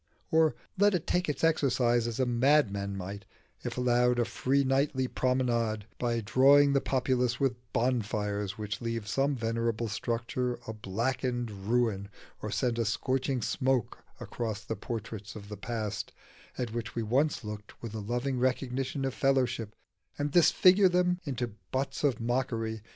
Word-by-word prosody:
or 160 -1 +4 0.2
let 205 -1 +5
it 175 -1 -2
take 180 -1 0
its 150 - -3
exercise 125 -7 +3
as 115 +1 -4
a 130 - +3
madman 120 -6 +2
might, 100 +2 -6 0.4
if - - -4
allowed 125 0 +3
a 120 - +2
free 140 +4 +1
nightly 135 0 +1
promenade, 120 -5 0
by 120 -1 0
drawing 140 +6 +5
the 140 - +3
populace 125 -3 0
with 135 -3 +1 0.2
bonfires 105 -4 -1
which 105 +1 -4
leave 115 -2 -3
some 135 +5 +1
venerable 115 -1 -1
structure 120 +3 -2
a 110 - -5
blackened 120 +3 -2
ruin 105 0 0 0.3
or 105 - -4
send 120 +2 0
a - - +3
scorching 130 +3 -1
smoke 130 -3 0 0.2
across 110 -2 -4
the 110 - -3
portraits 110 -3 -6
of 100 -1 -9
the 105 - -5
past, 110 -1 -4 0.5
at 120 -3 -3
which 115 -1 -4
we 115 - -1
once 135 +7 +1
looked 105 -1 -8
with 115 -2 -5
a 110 - -4
loving 125 +5 -2
recognition 130 +1 -1
of 135 - -1
fellowship, 125 -6 +1 0.4
and 145 0 -1
disfigure 185 +3 +6
them 180 0 +2
into 120 -5 -3 0.2
butts 135 +3 -2
of 140 -4 +2
mockery? 115 -2 -1
120 Hz, 155 wpm, -30 LUFS, 110-135 Hz, 0.5 s, disfigure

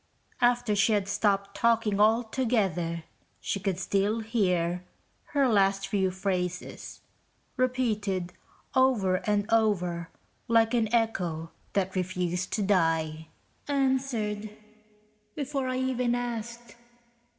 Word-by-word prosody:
After 240 -3 +3
she 215 +2 +3
had 200 -2 +1
stopped 200 0 0
talking 230 -3 +2
altogether, 215 -7 +1 0.4
she 200 - -2
could 190 -2 -1
still 200 +4 0
hear 180 -6 0 0.4
her 280 -2 +2
last 195 -3 +2
few 195 -2 +1
phrases, 185 -1 -4 0.5
repeated 215 -8 0 0.4
over 245 -9 +3
and 205 -1 +2
over, 180 -7 +1 0.4
like 225 0 +3
an 225 -3 +1
echo 180 -9 0 0.2
that 190 -1 0
refused 180 -1 -2
to 210 - 0
die. 165 -5 +1 0.4
(Answered... 260 -7 0 0.9
before 275 -2 -2
I 255 0 -1
even 250 -2 0
asked 235 -1 -5
210 Hz, 105 wpm, -28 LUFS, 185-235 Hz, 0.9 s, After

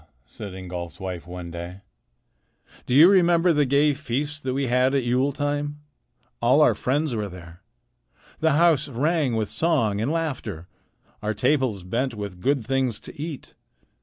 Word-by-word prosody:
said 100 -3 -9
Ingolf's 90 -2 -7
wife 90 -3 -6
one 90 -1 -7
day, 85 +3 -7 1.1
"do 125 - +1
you 155 +5 +9
remember 175 -2 +4
the 145 -2 +2
gay 145 +2 +3
feast 145 +2 -3
that 130 -1 -2
we 140 0 0
had 125 +2 +2
at 135 - +1
Yule 125 +4 +1
time? 145 +1 -2 0.6
All - - +4
our - - +5
friends 140 0 -1
were 105 -2 -3
there. 85 -1 -12 0.8
The 160 -1 +3
house 155 -2 +3
rang 140 0 0
with 110 -2 -2
song 115 -6 +1
and 125 +7 0
laughter. 130 - -3 0.5
Our 105 0 -2
tables 125 -6 +1
bent 120 +7 -2
with 100 -4 -7
good 135 -1 +1
things 130 -3 0
to - - -10
eat. 155 -3 -7
130 Hz, 160 wpm, -24 LUFS, 100-145 Hz, 1.1 s, you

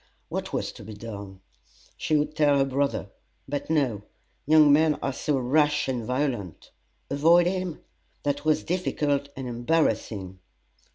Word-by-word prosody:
What - - -4
was - - -2
to - - -12
be 110 +1 -9
done? 100 -3 -8 0.5
She 155 - 0
would 150 +1 -1
tell 145 -3 +4
her 135 - +3
brother; 140 +1 -1 0.4
but 145 +2 -4
no 135 -10 +1 0.5
young 155 -1 +7
men 155 0 +4
are 135 - -3
so 145 +2 -1
rash 150 +3 +2
and 125 -3 -2
violent. 125 - -3 0.4
Avoid 165 +5 +5
him? 185 -2 -2 0.4
That 145 0 -1
was 155 0 +2
difficult 145 -5 -1
and 130 -1 -5
embarrassing. 120 - -1
145 Hz, 145 wpm, -26 LUFS, 120-155 Hz, 0.5 s, young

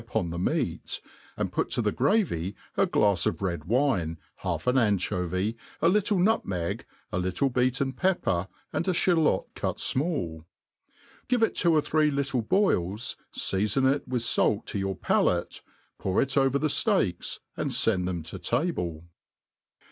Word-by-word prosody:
uppn 85 -2 -2
the 85 - -4
meat, 90 - -1 0.4
and - - -2
put, - - 0
to - - -1
the - - +1
gravy 100 - +1 0.2
a - - +3
glafs 100 -4 +2
of 80 - -1
red 90 -3 -1
wine^ 105 - +1 0.2
half - - -3
an 125 +1 +2
anchovy, 100 -3 +1 0.2
a - - +3
little 205 +2 +3
nutmeg, 100 - 0 0.2
a - - -1
little 95 +9 0
be^ten^pepper, 130 - 0 0.3
and 170 - -1
a 185 - +2
ftalot 165 - +2
cut - - -3
fmall; 130 - -1 0.8
give 245 -2 +2
it 225 - +2
two 170 - +2
or 155 - +4
three 155 0 +2
little 140 -3 0
boils, 110 - +1 0.2
feafon 105 +7 +1
it 145 - -5
with 125 -2 -1
fait 105 -2 +2
to 100 - -3
.your 95 0 -2
palate, - - 0 0.4
pour 95 -1 0
it 135 - +2
ovv 135 -1 +2
the 145 +7 +2
(leaks, 90 - -1 0.2
and 135 -4 -1
fend 105 -8 +3
thpm 85 -4 -3
to 80 - -7
table. 90 - -1
120 Hz, 155 wpm, -27 LUFS, 90-150 Hz, 0.8 s, or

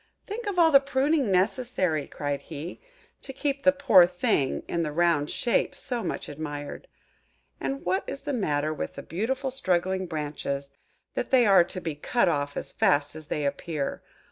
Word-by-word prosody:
"Think 435 +2 -5
of 400 -3 -2
all 330 -2 +6
the 275 - +9
pruning 275 -1 +1
necessary," 185 - +1
cried 145 -1 -3
he, 155 +5 -8 0.4
"to 270 - -7
keep 275 +1 -2
the 280 - +6
poor 265 -11 +6
thing 180 - 0
in 170 - -1
the 155 -2 -1
round 160 -2 +2
shape 240 - 0
so 245 -2 -3
much - - -4
admired. 145 -1 -6 0.7
And 135 0 -3
what 185 +2 +1
is 275 - -5
the 290 - -3
matter 155 - 0
with 155 - -5
the - - -7
beautiful 260 - -2
straggling 185 -6 0
branches, 145 -3 -4 0.4
that - - -2
they 255 -2 +5
are 195 -4 +7
to 185 - -6
be 165 -3 -3
cut 195 +11 +1
off 145 -1 -1
as - - -5
fast 145 +1 +2
as 155 -1 -9
they 150 -1 -2
appear? 140 +1 -3
180 Hz, 175 wpm, -27 LUFS, -, 0.7 s, the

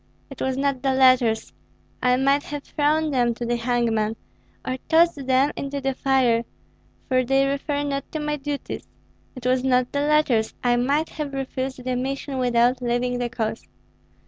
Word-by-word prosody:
"It 275 - -9
was 265 0 -1
not 275 -2 0
the 265 -1 +1
letters, 255 -4 +3 0.5
I 250 0 +3
might 275 +2 +3
have 290 -1 -6
thrown 305 +1 +1
them 240 -3 +1
to 240 - -4
the 240 +1 0
hangman, 230 -2 0 0.5
or 255 - -1
tossed 320 -4 +3
them 265 +2 +3
into 280 0 -4
the 270 0 -1
fire, 255 -3 +2 0.6
for 255 0 +2
they 270 +2 +2
refer 285 +1 -1
not 275 -1 -3
to 310 - -2
my 300 0 -2
duties; 290 0 -5 0.5
it 255 -1 -10
was 255 0 +2
not 250 -1 +2
the 285 - 0
letters. 290 -7 +2
I 245 -1 +3
might 280 +6 +1
have 295 -3 -5
refused 260 -1 -4
the 255 0 -1
mission 270 +1 -3
without 245 0 +2
leaving 245 0 -1
the 245 -1 -1
cause. 225 -2 -4
260 Hz, 170 wpm, -23 LUFS, 245-280 Hz, 0.6 s, letters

